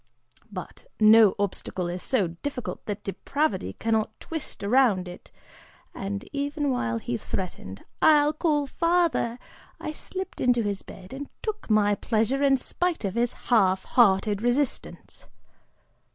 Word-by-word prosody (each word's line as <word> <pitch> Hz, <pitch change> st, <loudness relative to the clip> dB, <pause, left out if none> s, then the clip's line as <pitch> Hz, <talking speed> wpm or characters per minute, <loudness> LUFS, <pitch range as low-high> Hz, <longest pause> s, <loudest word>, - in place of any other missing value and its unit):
But 185 Hz, -3 st, -8 dB
no 215 Hz, -2 st, +7 dB
obstacle 190 Hz, -2 st, -2 dB
is 175 Hz, +1 st, -4 dB
so 210 Hz, -10 st, +1 dB
difficult 250 Hz, +9 st, -6 dB
that 205 Hz, -1 st, -4 dB
depravity 200 Hz, -, -1 dB
cannot 220 Hz, -, -1 dB
twist 320 Hz, -9 st, -6 dB
around 205 Hz, -4 st, +3 dB
it 180 Hz, -, -11 dB, 0.6 s
and 200 Hz, +1 st, -5 dB
even 285 Hz, 0 st, -1 dB
while 115 Hz, -, -1 dB
he 120 Hz, +1 st, -3 dB
threatened 100 Hz, -, -6 dB, 0.2 s
'I'll 300 Hz, -1 st, +5 dB
call 300 Hz, -2 st, +1 dB
father,' 335 Hz, -6 st, +1 dB, 0.4 s
I -, -, -4 dB
slipped 375 Hz, +4 st, -6 dB
into 245 Hz, -2 st, +3 dB
his 200 Hz, -2 st, -2 dB
bed 190 Hz, +4 st, -12 dB
and 280 Hz, +1 st, -6 dB
took 430 Hz, -, -4 dB
my 210 Hz, -1 st, +4 dB
pleasure 225 Hz, +5 st, 0 dB
in 275 Hz, -1 st, +4 dB
spite 350 Hz, -, -1 dB
of 190 Hz, -, -2 dB
his 235 Hz, +1 st, 0 dB, 0.2 s
half 190 Hz, -4 st, +4 dB
hearted 205 Hz, -3 st, +3 dB
resistance. 245 Hz, +3 st, -2 dB
225 Hz, 135 wpm, -26 LUFS, 195-285 Hz, 0.6 s, no